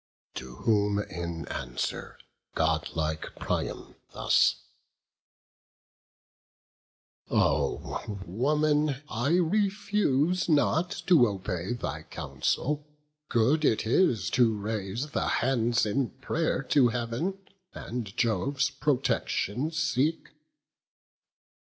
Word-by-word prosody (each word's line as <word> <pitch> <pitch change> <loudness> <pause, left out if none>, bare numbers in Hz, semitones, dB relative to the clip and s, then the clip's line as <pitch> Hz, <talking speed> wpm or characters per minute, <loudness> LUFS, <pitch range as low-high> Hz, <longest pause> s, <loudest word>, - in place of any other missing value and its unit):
To 65 -1 -7
whom, 105 - +2
in 85 -4 -4
answer, 60 -1 -4 0.4
godlike 80 0 -1
Priam - - -3 0.2
thus: - - +3 2.7
"O - - 0 0.2
woman, 145 - +1
I 120 +7 0
refuse 185 -3 +1
not 160 +3 +3 0.2
to 155 -10 +6
obey 95 -1 -3
Thy 120 - -4
counsel; 150 +2 -2 0.5
good 130 +7 +3
it 110 -7 +2
is 115 - +2
to 115 -4 +3
raise 110 +6 -3
the - - -1
hands 120 -3 +2
In 120 +4 0
pray'r 145 -1 -1
to 135 -4 +5
Heav'n, 120 +11 -2 0.4
and 115 -4 -6
Jove's 135 +6 +1
protection 135 -2 0
seek." 155 -1 0
125 Hz, 85 wpm, -28 LUFS, 105-150 Hz, 2.7 s, to